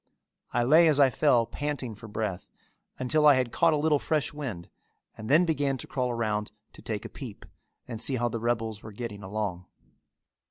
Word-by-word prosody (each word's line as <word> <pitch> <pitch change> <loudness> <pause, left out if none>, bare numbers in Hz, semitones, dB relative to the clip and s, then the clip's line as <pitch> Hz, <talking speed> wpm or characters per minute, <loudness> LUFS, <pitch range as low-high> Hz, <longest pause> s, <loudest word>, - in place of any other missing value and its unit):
I 120 - +1
lay 160 +7 +6
as 150 -2 +3
I 135 -2 +6
fell, 125 -4 +3
panting 145 -3 -4
for 110 +2 -11
breath, 105 -3 -4 0.5
until 150 +4 +2
I 145 - +8
had 125 -2 0
caught 165 -1 +3
a - - +2
little 150 -1 +2
fresh 150 -5 -1
wind 120 -13 -6 0.5
and 110 +1 -8
then 155 +6 +5
began 145 -4 0
to - - -7
crawl 125 -2 -2
around 110 -3 -2 0.2
to - - -14
take 105 -3 -4
a - - -3
peep - - -10 0.4
and 115 -3 -5
see 135 - +3
how 120 -1 0
the 115 0 -3
rebels 115 -2 -2
were 110 - -10
getting 105 -2 -6
along. 95 -3 -4
120 Hz, 195 wpm, -28 LUFS, 110-145 Hz, 0.5 s, I